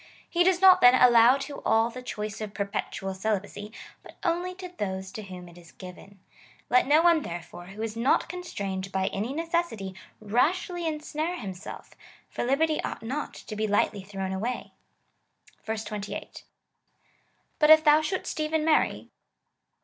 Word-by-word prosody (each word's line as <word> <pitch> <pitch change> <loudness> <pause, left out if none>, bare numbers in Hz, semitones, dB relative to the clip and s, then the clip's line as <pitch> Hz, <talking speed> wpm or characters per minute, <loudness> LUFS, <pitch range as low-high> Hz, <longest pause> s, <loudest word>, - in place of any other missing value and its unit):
He 350 0 +2
does 365 0 +2
not, 375 -1 +8
then, 245 +1 +8
allow 245 0 +6
to 280 +1 -7
all 225 +1 +2
the 255 - -8
choice 215 -4 -5
of 210 -1 -6
per 200 - -1
petual 195 -1 -4
celibacy, 205 +1 -3 0.3
but - - -15
only 355 +1 -1
to 370 0 -7
those 190 - -4
to 215 - -7
whom 185 -3 -10
it 175 0 -14
is 170 -1 -17
given. 190 +2 -12 0.5
Let 250 +1 +4
no 305 +3 +5
one, 340 -2 +5
therefore, 175 - -8
who 210 +3 -7
is 225 -1 -4
not 235 +4 +2
constrained 200 - -5
by 190 0 0
any 215 +6 -2
necessity, 325 - -2 0.3
rashly 330 - 0
insnare 310 +2 -3
himself, 190 - -8 0.4
for - - -3
liberty 305 +5 +1
ought - - -5
not 275 +6 -4
to 215 - -8
be 215 +1 -1
lightly 205 -1 +1
thrown 190 -1 -5
away.^ 220 0 -8
28. 210 -1 -7 1.1
But 300 -1 +4
if 315 0 +9
thou 300 0 +6
shouldest 340 +1 -3
even 310 0 0
marry. 320 -1 +1
230 Hz, 155 wpm, -27 LUFS, 200-315 Hz, 1.1 s, if